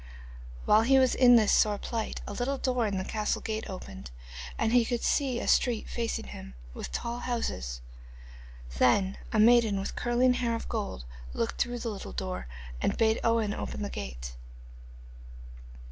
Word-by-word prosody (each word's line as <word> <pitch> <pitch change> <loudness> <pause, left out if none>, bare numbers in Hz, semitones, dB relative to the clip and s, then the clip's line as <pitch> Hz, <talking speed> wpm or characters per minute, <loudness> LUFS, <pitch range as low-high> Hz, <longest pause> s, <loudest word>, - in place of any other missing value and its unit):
While 215 +1 +6
he 265 +4 +4
was 260 -2 +4
in 245 -1 +7
this 220 -3 +5
sore 210 -1 +4
plight 225 +1 -4
a - - -6
little 255 +5 -1
door 250 -4 0
in 200 -2 -2
the 185 - -1
castle 215 -1 -1
gate 220 0 -4
opened, 65 - -8 0.5
and 225 +1 +1
he 245 -1 +6
could 240 0 -2
see 265 -4 +1
a - - -4
street 235 -4 +2
facing 230 -1 -3
him, 65 -1 -9 0.2
with - - -7
tall 235 - -3
houses. 65 - -3 1.0
Then 190 +10 +3
a 220 - +1
maiden 225 -2 +5
with 195 - -4
curling 245 +1 +2
hair 245 -2 0
of 230 - -5
gold 210 - -4 0.3
looked 115 - -2
through 245 0 -1
the 235 -1 -3
little 205 -3 -7
door 185 - -4 0.3
and - - 0
bade 220 0 +3
Owen 230 -3 +2
open 210 - -4
the 205 - -4
gate. - - -6
225 Hz, 170 wpm, -29 LUFS, 200-240 Hz, 1.0 s, in